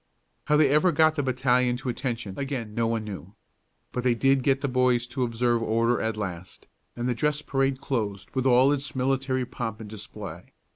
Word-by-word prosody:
How 150 - +3
they 150 -1 +5
ever 155 +6 +4
got 155 0 +4
the 155 - -1
battalion 125 -1 +1
to 130 0 -5
attention 120 -5 -3
again 135 -6 -4
no 115 +1 0
one 115 -1 -1
knew. 100 -2 -8 0.6
But 125 - -3
they 125 -2 +3
did 135 +2 +3
get 135 +1 +2
the 140 - 0
boys 125 -2 +2
to 125 +2 -5
observe 120 0 +1
order 115 +2 +1
at 110 -1 -2
last, 90 -3 -6 0.3
and 120 +1 -2
the 125 - +1
dress 150 +5 -1
parade 135 -1 0
closed 105 -8 -3
with 130 0 0
all 130 +2 +5
its 140 -1 -3
military 130 0 0
pomp 115 -3 -5
and 110 - -8
display. 105 -4 -9
125 Hz, 195 wpm, -26 LUFS, 115-135 Hz, 0.6 s, they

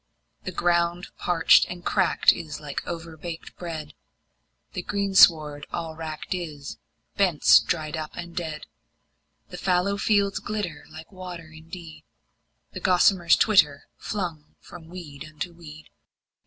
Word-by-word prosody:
The - - -3
ground 175 +1 0
parched 170 -2 +5
and 175 -1 -9
cracked 190 -3 +4
is 155 -4 -7
like 145 -2 -5
overbaked 165 0 -7
bread, 155 -4 -6 0.8
The - - -3
greensward 165 -7 +4
all 165 -2 -4
wracked 155 +2 -5
is, 155 -6 -6 0.4
bents 180 -7 +6
dried 155 -3 -2
up 155 -1 -6
and 170 0 -8
dead. 160 -3 -4 0.8
The - - -8
fallow 190 +2 +1
fields 200 -2 +2
glitter 195 -8 -4
like 160 +3 -11
water 180 -4 -9
indeed, 160 0 -11 0.7
And - - -7
gossamers 180 -1 +4
twitter, 150 -10 +4
flung 170 -7 -5
from 160 - -13
weed 160 -5 -9
unto 155 +3 -7
weed. 155 -2 -13
170 Hz, 125 wpm, -25 LUFS, 155-180 Hz, 0.8 s, bents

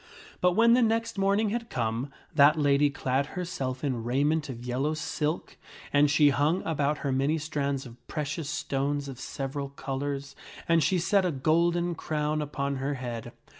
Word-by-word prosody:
But 180 0 +3
when 230 +4 +5
the 250 - +5
next 225 -1 +1
morning 200 +2 +2
had 235 +1 -3
come, 115 +3 -2 0.2
that 150 +1 +6
lady 145 -1 +4
clad 140 0 -1
herself 135 -8 -3
in 130 -5 -1
raiment 145 +5 +1
of 120 -1 -7
yellow 135 +5 -1
silk, 155 +1 -3 0.4
and 145 0 +5
she 145 +1 +5
hung 150 +6 +1
about 150 -2 0
her 140 - +1
many 135 +4 +1
strands 140 -3 -2
of 120 -1 -14
precious 150 0 -3
stones 140 0 -1
of 130 -2 -8
several 140 0 -4
colors, 140 0 -4 0.3
and 165 -1 +4
she 185 - +2
set 195 +3 +2
a 180 - +1
golden 170 +4 +2
crown 155 -1 -1
upon 140 -1 -2
her 140 +2 -2
head. 120 -3 -5
145 Hz, 170 wpm, -28 LUFS, 135-165 Hz, 0.4 s, that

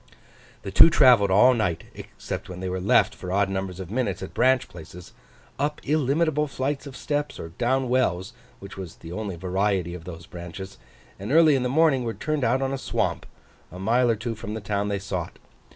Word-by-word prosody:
The 95 - -5
two 95 - +8
travelled 125 -10 +5
all 105 +7 +6
night, 95 -9 -1
except - - -7
when 90 -1 -7
they 95 0 -3
were 95 0 -2
left, 95 - +3
for 90 - -7
odd 100 +1 +2
numbers 95 -1 -4
of 95 -1 -7
minutes, 110 -6 -2
at 95 - -8
branch 130 -1 +3
places, 85 +1 -12 0.5
up 150 +2 -1
illimitable 150 +1 +1
flights 135 +1 -3
of 135 - -9
steps, 145 0 -3
or 80 - -6
down 125 +8 0
wells—which 120 -3 -3
was 90 -3 -7
the 80 - -11
only 100 0 -4
variety 95 0 -1
of 85 -2 -9
those 85 -2 -9
branches—and, 95 +4 -10
early 160 0 +6
in 135 - +2
the 125 - -1
morning, 140 -2 +3
were 115 -1 -3
turned 155 -3 -2
out 130 +3 +2
on 135 0 -1
a 135 - -3
swamp, - - -2 0.4
a 90 - -9
mile 120 +6 +2
or 115 - +3
two 115 +2 -4
from 105 -1 -6
the - - -3
town 100 0 -2
they 100 -1 -1
sought. 95 -3 -5
105 Hz, 200 wpm, -25 LUFS, 95-130 Hz, 0.5 s, two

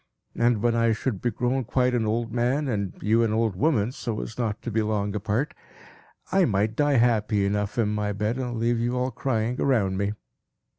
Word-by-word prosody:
And 115 -3 +2
when 120 -1 +3
I 115 -1 +3
should 110 -2 -3
be 120 - +1
grown 125 +4 -1
quite 125 +2 +1
an 115 -3 +1
old 115 +1 -1
man, 125 +5 +1
and 100 -6 -2
you 110 +3 +3
an 115 -2 +2
old 110 -2 +1
woman, 115 - +1
so 115 -4 -4
as 115 - -7
not 110 -3 -2
to 120 - -4
be 110 +1 +1
long 105 -2 -1
apart, 105 +7 -1 0.8
I 190 0 +4
might 105 0 0
die 145 0 +2
happy 110 -4 +2
enough 105 +1 -1
in 110 -3 +2
my 105 -1 -1
bed, 105 +5 -2
and 120 -2 -3
leave 115 +1 +1
you 120 +2 0
all 125 +1 0
crying 120 -1 -1
around 105 -9 +2
me. 100 +1 0
115 Hz, 205 wpm, -25 LUFS, 105-125 Hz, 0.8 s, I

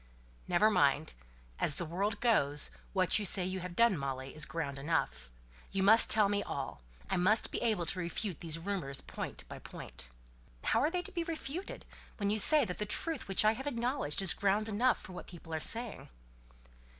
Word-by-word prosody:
"Never 215 +1 +3
mind. 145 -3 +2 0.5
As 145 - +3
the 175 - -3
world 200 +6 -2
goes, 145 - +3 0.2
what 185 0 +2
you - - -3
say 190 -1 +4
you 185 +1 -3
have 180 -1 -7
done, 230 -2 +4
Molly, 135 -2 -5
is 155 -1 -1
ground 140 -5 -4
enough. 65 - -2 0.4
You 195 - -1
must 220 +3 +7
tell 215 -2 +7
me 205 0 0
all. 135 - -5 0.3
I - - -1
must 195 +5 +2
be - - -3
able 215 -7 0
to 185 - +1
refute 180 +1 -4
these 165 -2 -3
rumours 165 -6 -3
point - - -7
by - - -9
point." 60 - -9 0.5
"How 225 - +2
are 290 +6 +2
they 355 +1 -3
to 400 - -3
be 345 -2 -2
refuted, 330 +2 -6 0.3
when 200 -1 0
you 215 - +3
say 300 +5 +6
that 180 -4 -6
the 210 - -1
truth 310 +4 -3
which 195 +2 +3
I 215 - +6
have 265 +6 -6
acknowledged 240 - -1
is 185 - +6
ground 205 +2 0
enough 225 +3 +1
for 185 - -11
what 180 - -9
people 165 -2 -11
are 160 - -1
saying?" 230 +7 -3
195 Hz, 200 wpm, -32 LUFS, 165-225 Hz, 0.5 s, must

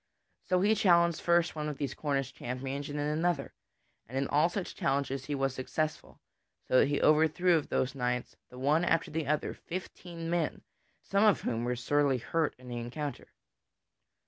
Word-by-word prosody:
So 180 0 +3
he 210 +3 +4
challenged 170 -6 +4
first 170 -1 +2
one 150 -1 -2
of 145 - -5
those 140 -3 -3
Cornish 135 -3 -2
champions 135 +4 -4
and 145 - -4
then 145 - -1
another, 165 -3 0 0.5
and 130 +4 -5
in 135 0 0
all 150 +4 +3
such 180 0 -4
challenges 135 -1 -1
he 145 - -2
was 135 -1 0
successful, 155 +4 -3 0.5
so 130 - +5
that - - +5
he 145 0 0
overthrew 160 +4 +4
of 155 - -1
those 130 0 0
knights, 125 -2 -2
the 125 - -12
one 145 +6 +2
after 170 -2 +1
the 155 -2 -2
other, 150 +1 0
fifteen 175 -2 -7
men, 170 -2 -1 0.4
some 200 +1 +2
of 210 -3 +4
whom 120 0 -2
were 125 0 0
sorely 140 +2 +2
hurt 155 +6 -1
in 125 0 -14
the 120 -1 -5
encounter. 125 +4 -5
145 Hz, 180 wpm, -31 LUFS, 135-170 Hz, 0.5 s, so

